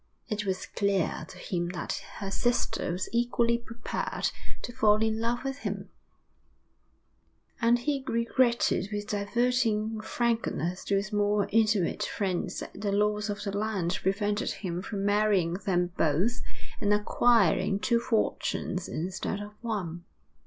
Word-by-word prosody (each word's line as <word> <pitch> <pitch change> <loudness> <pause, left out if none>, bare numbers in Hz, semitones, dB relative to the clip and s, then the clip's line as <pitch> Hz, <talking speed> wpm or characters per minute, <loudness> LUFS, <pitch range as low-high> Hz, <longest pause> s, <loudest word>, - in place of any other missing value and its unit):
It 210 -1 -2
was 190 -1 -1
clear 195 -5 0
to - - -11
him 175 -2 -2
that 175 - -3
her 195 -1 -4
sister 240 -4 0
was 180 +2 -2
equally 235 0 +2
prepared 235 0 -3 0.3
to 240 - -5
fall 215 -3 +4
in 220 0 +1
love 240 +2 0
with 270 0 -3
him, - - -4 1.7
and 235 +1 +5
he 275 +2 -1
regretted 235 -4 +2
with 205 0 -3
diverting 220 0 +1
frankness 220 -6 -1
to 200 - +1
his 200 +2 -1
more 205 0 +2
intimate 215 -4 +2
friends 185 -3 -1
that - - -8
the 205 -1 0
laws 210 +1 +1
of 205 0 -3
the 200 -1 -3
land 200 -4 0
prevented 205 +2 0
him 175 -3 -3
from 195 0 -3
marrying 205 -4 +3
them 180 -2 +2
both 175 +11 +2 0.4
and 205 -1 +1
acquiring 210 -3 +3
two 205 +5 +2
fortunes 215 -5 -1
instead 185 +4 -3
of 205 0 -7
one. 185 -8 -3
210 Hz, 140 wpm, -29 LUFS, 190-230 Hz, 1.7 s, and